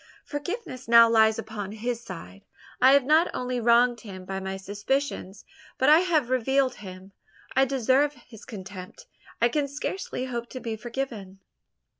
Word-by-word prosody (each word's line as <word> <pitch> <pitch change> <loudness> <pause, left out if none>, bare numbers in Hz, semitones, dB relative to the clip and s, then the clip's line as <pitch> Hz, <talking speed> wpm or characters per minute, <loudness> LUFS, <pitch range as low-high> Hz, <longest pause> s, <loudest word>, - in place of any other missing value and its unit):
"Forgiveness 290 - -6
now 230 0 +8
lies 220 -1 +4
upon 210 -2 -6
his 235 +2 -3
side. 95 - -9 0.4
I 260 +2 +7
have 280 -1 +5
not 310 +6 +4
only 250 0 -2
wronged 235 0 +3
him 190 -4 -9
by 190 +1 -4
my 190 0 -4
suspicions, 205 +1 -3 0.3
but 265 - +3
I 310 +2 +8
have 315 -9 +1
reviled 260 +1 +2
him. 190 -1 -11 0.4
I 265 +1 +5
deserve 270 +2 +2
his 235 -3 -15
contempt, 190 - -9 0.3
I 235 - +4
can 285 +3 -1
scarcely 280 -1 -4
hope 240 -2 -5
to 255 - -7
be 230 -3 -4
forgiven." 225 -4 -6
235 Hz, 155 wpm, -26 LUFS, 205-270 Hz, 0.4 s, now